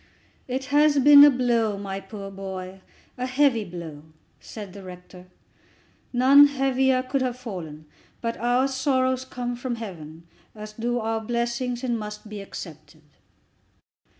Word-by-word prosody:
"It 260 +1 -3
has 295 0 +4
been 285 +1 +9
a 290 - +9
blow, 235 -5 +1
my 195 -1 -5
poor 195 0 -9
boy, 190 -1 -7 0.4
a 250 - -2
heavy 255 -3 +2
blow," 170 -5 -8 0.4
said 205 -4 -9
the 200 - -10
rector. 180 0 -12 0.8
"None 270 +3 +7
heavier 265 -2 +1
could 260 +1 -2
have 250 -1 -2
fallen. 170 -11 -8 0.3
But 230 0 -3
our 245 +3 +1
sorrows 260 -1 0
come 245 -1 -5
from 245 0 -4
Heaven, 165 -7 -9 0.3
as 215 0 -9
do 240 +2 -2
our 225 -1 -2
blessings, 235 +2 -2
and 240 -3 -1
must 210 0 -8
be 210 -1 -7
accepted." 195 - -10
235 Hz, 140 wpm, -24 LUFS, 195-260 Hz, 0.8 s, been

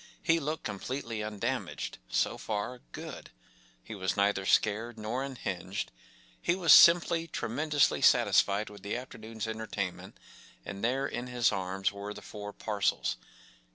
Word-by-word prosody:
He 165 0 +3
looked 155 +1 -3
completely 115 +2 -4
undamaged—so 105 - -2
far, 110 +4 -3
good; - - -8 0.5
he - - -8
was 95 -3 -2
neither 100 -1 +2
scared 110 +3 +2
nor 110 +4 -3
unhinged, 100 -8 -4 0.5
he 175 - +2
was 180 -3 +6
simply 170 -1 +7
tremendously 145 +2 +1
satisfied 100 +1 +4
with 100 -1 -12
the 100 +4 -3
afternoon’s 110 -3 -7
entertainment, 110 -4 -4 0.5
and 100 +1 -7
there 130 +4 +1
in 125 -2 -4
his 125 -2 +2
arms 95 0 -1
were 100 +1 -6
the - - -10
four 105 -1 -7
parcels. 105 -1 -1
110 Hz, 130 wpm, -30 LUFS, 100-130 Hz, 0.5 s, simply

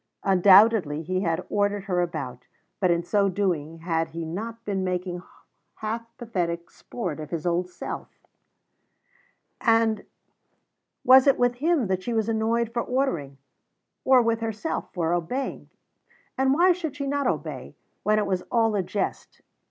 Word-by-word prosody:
Undoubtedly 190 -4 +5
he 185 +3 -1
had 165 -4 -1
ordered 205 -1 0
her 180 -2 0
about, 125 -8 -5 0.3
but 185 - +2
in 170 0 +2
so 200 +3 +2
doing 165 -5 -2
had 165 -1 0
he 165 +1 -6
not 225 +8 -6
been 195 -2 -1
making 180 -1 -3 0.5
half 225 +1 -4
pathetic 175 -8 -3
sport 180 -11 -5
of 155 -1 -7
his 165 -2 -4
old 175 +1 0
self - - -6 1.6
and 225 -3 +3 1.0
was 260 +1 +7
it 275 - +5
with 245 0 +1
him 310 -1 +2
that 190 -1 -1
she 235 +4 -3
was 220 -1 +1
annoyed 230 +1 0
for 235 - 0
ordering, 175 - -1 0.7
or 260 -2 +5
with 230 0 +1
herself 225 +6 -3
for 170 -1 -1
obeying? 180 +11 -3 0.7
And 265 +1 +2
why 360 +4 +5
should 330 -5 -3
she 280 -1 -4
not 280 0 0
obey, - - -4 0.3
when 215 0 +2
it 210 - +1
was 190 -2 -1
all 225 -3 +2
a 200 - +2
jest? 200 +3 -4
205 Hz, 150 wpm, -25 LUFS, 175-235 Hz, 1.6 s, was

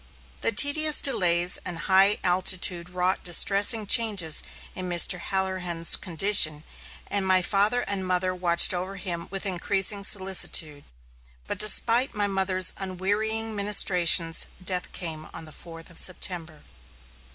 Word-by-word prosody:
The - - -1
tedious 295 +7 +2
delays 175 -8 +1
and 175 -2 -7
high 195 +4 +1
altitude 180 -1 +1
wrought 180 +1 -2
distressing 200 +5 +2
changes 200 -7 +2 0.3
in 185 -1 -8
Mr. 175 +1 +2
Halloran's 185 -3 -2
condition, 165 -4 +1 0.4
and 200 -1 -2
my 185 -1 +2
father 205 +6 0
and 200 -4 -5
mother 185 0 -2
watched 175 -1 +3
over 185 +2 -6
him 175 -3 -7
with 195 +1 -7
increasing 195 +2 -1
solicitude. 185 -6 0 0.6
But - - -8
despite 230 +4 +2
my 205 -1 -2
mother's 190 -2 +1
unwearying 210 +4 -4
ministrations, 180 -5 +3 0.2
death 180 -1 -2
came 160 -3 -7
on 165 - -9
the 155 - -13
fourth 165 +2 -11
of 165 - -5
September. 170 -4 -3
185 Hz, 130 wpm, -23 LUFS, 175-200 Hz, 0.6 s, watched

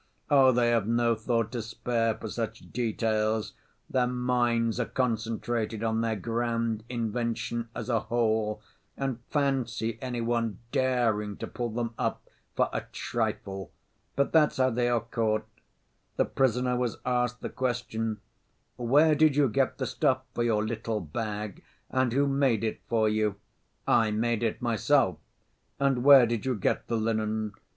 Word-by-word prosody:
Oh, 135 -2 +7
they 120 -1 +3
have 115 -3 +1
no 115 0 +2
thought 115 0 -1
to 120 -2 -3
spare 115 0 -1
for - - -7
such - - -5
details, 110 -2 0 0.3
their 125 -1 +1
minds 120 -2 +1
are 120 - 0
concentrated 115 -2 -1
on 110 0 +1
their 115 -1 0
grand 115 +1 -1
invention 115 0 -2
as - - -5
a 115 -3 +2
whole, 110 -2 0 0.3
and 135 -3 -2
fancy 125 -6 -1
any 125 -2 -3
one 115 -3 -1
daring 115 -6 +1
to - - -4
pull 120 -1 -4
them 115 +1 -3
up - - -2 0.3
for - - +3
a - - -1
trifle! 95 -2 -3 0.4
But 140 - +1
that's 155 -2 +4
how 130 0 +3
they 120 +1 +1
are 120 -2 +2
caught. 110 -2 -1 0.7
The - - +2
prisoner 125 -1 +1
was 125 -1 -1
asked 125 -1 0
the - - -4
question, 115 -4 -2 0.6
'Where 145 +6 +4
did 150 -1 +4
you 145 -1 +4
get 135 +3 +1
the 130 - -2
stuff 130 +1 +1
for - - -2
your 110 -2 +1
little 110 0 -2
bag 105 +4 -5 0.3
and 130 -2 +2
who 140 +4 +2
made 135 -6 +2
it 110 - -2
for 110 -2 +3
you?' 105 -1 +1 0.5
'I 115 -2 +4
made 115 +2 0
it 115 +2 -1
myself.' 115 - +2 0.6
'And 135 -3 +2
where 135 -3 +9
did 115 -2 -2
you 130 -1 0
get 100 - -1
the 115 - 0
linen? 110 -1 -1
115 Hz, 155 wpm, -28 LUFS, 110-125 Hz, 0.7 s, where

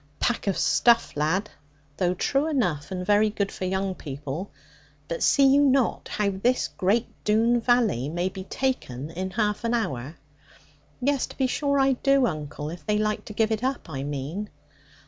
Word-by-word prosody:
'Pack 240 -3 0
of 195 - +1
stuff 235 -1 +3
lad. 165 +8 0 0.5
Though 180 -1 +1
true 275 - +1
enough, 180 - 0
and 180 -1 -4
very 210 +2 +4
good 200 -1 -2
for 185 - -5
young 190 +1 -1
people. 145 +3 -6 0.6
But 165 - -4
see 280 - +5
you 275 +1 +6
not 270 -3 +2
how 205 -1 +1
this 240 +7 0
great 210 +6 +1 0.2
Doone 230 +3 +3
valley 225 - +2
may 175 +3 -1
be 190 0 -6
taken 160 - -3
in 185 +3 -4
half 210 +2 -1
an 230 +1 +1
hour?' 145 - -3 0.9
'Yes, 275 0 +1
to - - -13
be 265 - +2
sure 280 +2 0
I 270 0 +4
do, 275 +1 +3
uncle; 150 -5 -4
if 170 -2 -9
they 210 +6 +1
like 215 0 -1
to 210 - -8
give 220 +1 +1
it 220 +1 -1
up, 260 -10 -2
I 135 -3 -4
mean.' 145 +9 -4
205 Hz, 180 wpm, -25 LUFS, 170-240 Hz, 0.9 s, you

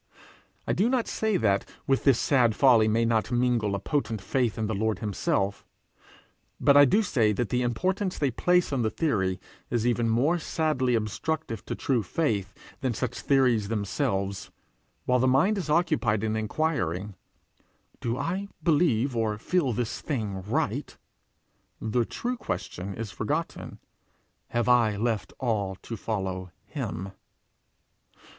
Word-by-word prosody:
I - - 0
do 215 +5 +2
not 255 -3 +1
say 220 -3 0
that 100 - +2 0.2
with 135 -1 +1
this 135 -4 +6
sad 120 -5 +3
folly 120 -5 +5
may 115 +2 +2
not 115 +1 +1
mingle 120 -4 +1
a - - -2
potent 115 -3 -1
faith 120 +3 0
in 110 - -1
the 110 - -2
Lord 110 +2 0
himself; 100 -1 -1 1.0
but 140 -1 +5
I 145 0 +9
do 210 - +3
say 115 - +2
that 120 +1 -1
the 125 - +1
importance 185 - -1
they 140 -3 +1
place 180 +5 +2
on 120 -5 +1
theory 95 - 0 0.3
is 120 -1 0
even 120 -1 +1
more 140 +10 +2
sadly 150 -6 0
obstructive 115 +3 -2
to - - -3
true 130 -4 0
faith 105 - -1 0.3
than 130 -4 -1
such 125 +1 -3
theories 125 -7 +2
themselves: 100 -2 -2 0.6
while 125 0 +3
the 130 - +3
mind 170 +11 +3
is 170 - -5
occupied 150 - +2
in 110 0 0
enquiring, 105 - -1 0.9
'Do 120 +1 -2
I 185 +8 -2 0.2
believe 145 -6 +2
or 110 -2 0
feel 145 +4 0
this 120 0 -3
thing 105 -9 -3
right?' 100 +4 -2 0.8
the 115 +2 0
true 245 - -3
question 95 - -5
is 115 -3 -5
forgotten: 150 - -3 0.7
'Have 120 0 -1
I 115 -4 +4
left 105 -4 -1
all 105 -6 -1
to 115 - -5
follow 95 -4 -3 0.2
him?' 95 +2 -5
120 Hz, 145 wpm, -27 LUFS, 105-145 Hz, 1.0 s, I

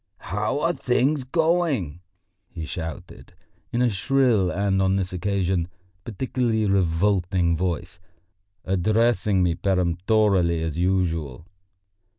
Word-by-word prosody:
"How 105 +8 -1
are 170 - +1
things 135 +1 0
going?" 155 - 0 0.5
he 80 - -7
shouted, 80 +1 -8 0.4
in 120 +1 +1
a 120 - +2
shrill 115 -3 +2
and 95 +1 0
on 95 0 +2
this 95 -1 -2
occasion 95 -2 -1 0.4
particularly 115 0 -1
revolting 90 -1 +1
voice, 85 0 -3 0.7
addressing 105 +1 +2
me 90 -1 +2
peremptorily 90 -1 +1
as 80 -3 -3
usual. 85 -6 -1
95 Hz, 105 wpm, -24 LUFS, 85-110 Hz, 0.7 s, a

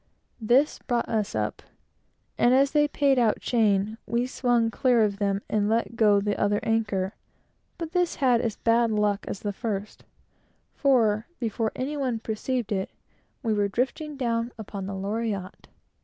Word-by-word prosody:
This 250 +7 +3
brought 240 -2 -1
us 215 -2 -1
up, - - -2 0.7
and 245 +2 +4
as 275 +1 +4
they 295 -1 +3
paid 280 -2 +2
out 225 -3 +2
chain, 215 -2 +1
we 235 +1 0
swung 240 -3 +1
clear 245 -2 +3
of 200 -1 -1
them, 200 -1 0
and 210 -1 0
let 225 -1 0
go 210 -3 +4
the 205 0 -1
other 205 0 +2
anchor; 205 -4 0 0.6
but 330 -2 -5
this 355 -2 +1
had 250 -4 +3
as 225 -4 -2
bad 230 0 +2
luck 210 -1 +1
as 195 - -5
the 205 -1 -3
first, 210 -1 -4 0.7
for, 225 -5 +2
before 225 -1 -1
any 275 +4 -3
one 255 -4 -1
perceived 225 +2 -3
it, 190 -2 -1 0.5
we 225 -2 +1
were 205 -1 +1
drifting 270 +7 -3
on 230 0 0
to - - -28
the 200 -2 -6
Loriotte. 200 -1 -4
225 Hz, 160 wpm, -26 LUFS, 205-245 Hz, 0.7 s, and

